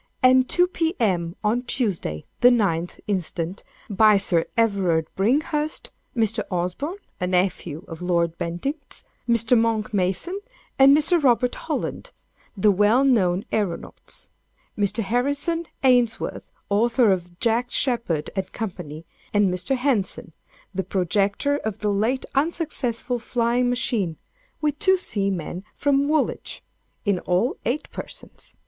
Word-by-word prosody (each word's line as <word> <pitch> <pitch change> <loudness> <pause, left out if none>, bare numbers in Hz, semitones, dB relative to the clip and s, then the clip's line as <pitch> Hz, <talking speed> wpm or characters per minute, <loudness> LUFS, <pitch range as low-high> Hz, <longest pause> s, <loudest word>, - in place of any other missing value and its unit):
and 255 0 +5
2, 355 - +5
P.M., 225 - 0
on 220 +3 +2
Tuesday, 205 - -2
the 245 - +7
9th 185 -8 +1
instant, 180 -2 -3 0.2
by 215 0 +5
Sir 170 -4 +1
Everard 190 -8 +2
Bringhurst; 295 +8 0 0.3
Mr. 225 -1 +1
Osborne, 185 - -2 0.2
a 180 - -1
nephew 180 -2 -1
of 165 0 -8
Lord 170 -2 +1
Bentinck's; 270 - -4 0.3
Mr. 230 +1 +4
Monck 225 -2 +1
Mason 195 - -1 0.4
and 275 +2 +8
Mr. 325 +3 +3
Robert 250 -1 +3
Holland, - - -4 0.5
the 205 +2 +5
well 210 +7 +4
known 195 -8 +2
æronauts; 200 -6 -3 0.5
Mr. 210 +2 0
Harrison 285 - 0 0.2
Ainsworth, 245 -3 +2 0.2
author 230 +2 +4
of 175 -2 -2
"Jack 235 +2 +1
Sheppard," 235 - 0
&c. 180 -5 -5 0.3
and 200 -3 +3
Mr. 185 +9 -1
Henson, 245 - -1 0.4
the 190 0 -1
projector 200 - +1
of 220 -7 -4
the 210 -1 0
late 225 +6 0
unsuccessful 275 -5 -1
flying 240 +1 +1
machine—with 255 - -3
two 380 0 +4
seamen 195 - -2
from 280 0 +2
Woolwich—in 230 - -2
all, 180 +9 0
eight 260 +6 -1
persons. - - -8
220 Hz, 115 wpm, -24 LUFS, 185-260 Hz, 0.5 s, and